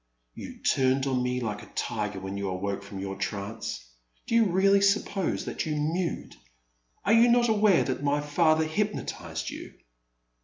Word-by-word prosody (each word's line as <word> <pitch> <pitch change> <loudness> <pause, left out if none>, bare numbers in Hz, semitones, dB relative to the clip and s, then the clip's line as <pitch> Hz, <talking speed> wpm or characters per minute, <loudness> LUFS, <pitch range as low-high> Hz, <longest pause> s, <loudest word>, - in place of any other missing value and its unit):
'* - - -47
You - - -9
turned 130 0 +2
on 130 -2 0
me 125 0 -1
like 105 -3 -3
a - - -12
tiger 105 -2 -2
when 95 +1 -6
you 100 -1 -3
awoke 100 +2 -3
from 100 0 -9
your 95 0 -4
trance. 100 - -4 0.4
Do - - -4
you 230 -1 +5
really 195 +1 +4
suppose 200 -1 +1
that - - -3
you 155 - -1
mewed? 165 +4 -2 0.7
Are 210 - +4
you 230 +1 +6
not 240 0 +4
aware 210 -4 +4
that 130 - -3
my 145 0 +1
father 155 +2 +2
hypnotized 210 +7 -3
you - - -9
145 Hz, 170 wpm, -27 LUFS, -, 0.7 s, you